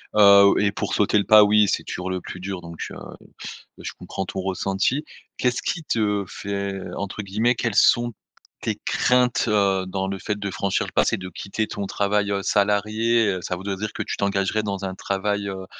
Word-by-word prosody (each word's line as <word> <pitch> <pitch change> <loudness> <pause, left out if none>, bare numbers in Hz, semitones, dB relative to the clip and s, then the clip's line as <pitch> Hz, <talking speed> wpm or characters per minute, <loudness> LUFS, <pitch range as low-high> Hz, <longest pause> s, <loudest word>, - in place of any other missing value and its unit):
heu 100 -1 +8
et 100 0 +2
pour - - -3
sauter 105 0 +2
le 100 - +3
pas 105 0 +7
oui, 105 0 +4
c'est 95 - 0
toujours 90 +1 -5
le 90 -1 -3
plus 90 - -8
dur, 95 0 -5
donc 85 -1 -10
heu - - -8 0.6
heu, - - -18
je - - -4
comprends 95 - -5
ton 95 - -5
ressenti. 95 - -1 0.3
Qu'est-ce 125 -1 0
qui 165 - -3
te 105 -6 0
fait, 100 +1 -4 0.2
entre 100 +1 -5
guillemets, 110 +5 +1
«quelles 115 -3 -2
sont 120 +2 +4 0.5
tes - - -2
craintes,» 125 -1 +2
heu, 100 -3 +2
dans 95 +1 -3
le 95 0 -3
fait 105 +1 -3
de 100 -1 -3
franchir 95 +1 -1
le - - -10
pas? - - +4
C'est - - 0
de 95 -1 -7
quitter 100 +4 -4
ton 100 -1 -5
travail, 100 0 0
heu, 100 - 0
salarié, 105 +3 +2
heu, 90 - -4
ça 90 - -3
voudrait 95 +2 -4
dire 105 +2 -4
que - - -3
tu - - -4
t'engagerais 100 +1 0
dans 100 -2 -3
un 95 -1 -4
travail, 100 +1 -2
heu 95 -1 -6
100 Hz, 210 wpm, -23 LUFS, 95-105 Hz, 0.6 s, heu